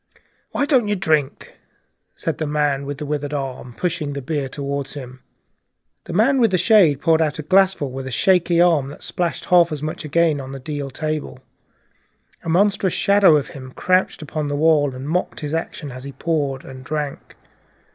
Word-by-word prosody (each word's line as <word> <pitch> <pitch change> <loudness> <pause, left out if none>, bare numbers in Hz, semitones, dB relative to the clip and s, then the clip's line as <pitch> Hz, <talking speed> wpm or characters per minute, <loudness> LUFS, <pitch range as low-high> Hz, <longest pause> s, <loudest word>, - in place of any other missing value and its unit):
"Why 285 - 0
don't 260 -7 +3
you 205 - +1
drink?" 155 -7 -1 0.6
said - - -3
the 155 - -1
man 145 -2 0
with 145 -1 -4
the 150 - -5
withered 145 0 -3
arm, 130 -3 -5
pushing 165 -5 -2
the 140 - -4
beer 140 -1 -2
toward 140 0 -3
him. 130 -2 -8 0.9
The - - -6
man 250 +8 +3
with 230 - +5
the 185 - +1
shade 180 -7 +5
poured 165 -1 +3
out 155 -2 0
a 155 - -5
glassful 190 -5 +2
with 135 0 -6
a - - -4
shaking 175 +5 +2
hand, 165 -6 +3
that - - -12
splashed 175 -2 -3
half 175 -2 +5
as 150 -1 -4
much 155 +1 -4
again 155 -1 +1
on 135 0 -8
the 135 - -6
deal 145 0 -5
table. 155 -1 -4 1.1
A - - -4
monstrous 195 +1 +2
shadow 200 -5 +5
of 145 -2 0
him 130 -1 -10
crouched 185 -3 +1
upon 150 0 -3
the 145 - -2
wall, 145 -3 +3
and 130 +2 -7
mocked 175 +2 -2
his 150 0 -4
action 160 -3 -4
as 130 +1 -9
he 140 0 -8
poured 145 -5 -2
and 130 -1 -10
drank. 150 0 -5
150 Hz, 190 wpm, -21 LUFS, 140-175 Hz, 1.1 s, with